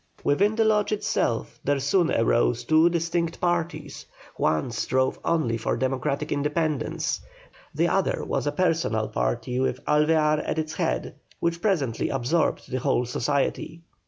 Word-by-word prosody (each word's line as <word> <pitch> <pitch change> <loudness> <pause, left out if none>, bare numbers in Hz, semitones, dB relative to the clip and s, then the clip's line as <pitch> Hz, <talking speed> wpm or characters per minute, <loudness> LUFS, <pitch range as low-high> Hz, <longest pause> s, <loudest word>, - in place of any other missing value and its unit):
Within 200 +9 +2
the 225 0 +2
Lodge 210 -1 +2
itself 160 - -1
there 145 0 +1
soon 165 +6 +2
arose 120 +1 +2
two 160 +5 +4
distinct 170 0 -1
parties, 165 -4 -2 0.3
one 80 +10 0
strove 130 +3 0
only 130 -9 +1
for 115 - -1
democratic 130 +1 -1
independence, 150 -1 -1 0.5
the - - +2
other - - 0
was - - -2
a - - +2
personal - - 0
party 60 - -1
with 130 - -1
Alvear 150 0 +3
at - - -3
its 155 0 -2
head, - - -2 0.3
which 170 0 -1
presently 155 - 0
absorbed 135 +5 0
the 130 - -1
whole 125 0 +1
society. 140 +6 -2
150 Hz, 140 wpm, -25 LUFS, 130-170 Hz, 0.5 s, two